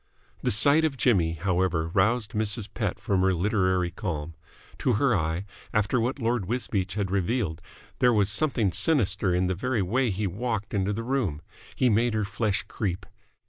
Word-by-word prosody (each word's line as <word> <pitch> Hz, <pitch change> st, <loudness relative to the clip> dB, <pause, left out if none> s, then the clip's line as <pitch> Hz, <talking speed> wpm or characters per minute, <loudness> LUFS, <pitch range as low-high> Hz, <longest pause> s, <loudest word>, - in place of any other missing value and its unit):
The -, -, 0 dB
sight 140 Hz, +10 st, +5 dB
of 150 Hz, -4 st, 0 dB
Jimmy, 90 Hz, -11 st, +2 dB
however, 90 Hz, -1 st, 0 dB
roused 105 Hz, +4 st, +1 dB
Mrs. 105 Hz, 0 st, -2 dB
Pett 105 Hz, -5 st, -2 dB
from 95 Hz, -2 st, 0 dB
her 95 Hz, 0 st, +2 dB
literary 95 Hz, -2 st, +1 dB
calm. 85 Hz, -3 st, -4 dB, 0.5 s
To -, -, +1 dB
her -, -, +2 dB
eye, 80 Hz, +4 st, -1 dB, 0.3 s
after 105 Hz, +3 st, +2 dB
what 125 Hz, +5 st, -1 dB
Lord 115 Hz, -6 st, -1 dB
Wisbeach 105 Hz, -5 st, -2 dB
had 100 Hz, -3 st, -2 dB
revealed 95 Hz, -4 st, -1 dB, 0.4 s
there 125 Hz, -, +5 dB
was 105 Hz, -3 st, +2 dB
something 120 Hz, -7 st, +1 dB
sinister 100 Hz, -, +2 dB
in 90 Hz, +1 st, +1 dB
the 90 Hz, -, 0 dB
very 115 Hz, +3 st, -1 dB
way 125 Hz, +9 st, +1 dB
in 105 Hz, -, -1 dB
which -, -, -8 dB
he 105 Hz, -, -1 dB
walked 105 Hz, +2 st, -3 dB
into 100 Hz, 0 st, 0 dB
the 115 Hz, +3 st, -3 dB
room. 115 Hz, -, -1 dB, 0.3 s
He 130 Hz, -, +2 dB
made 115 Hz, 0 st, +2 dB
her 105 Hz, -1 st, 0 dB
flesh 105 Hz, 0 st, -1 dB
creep. 95 Hz, -2 st, -4 dB
100 Hz, 180 wpm, -26 LUFS, 95-115 Hz, 0.5 s, sight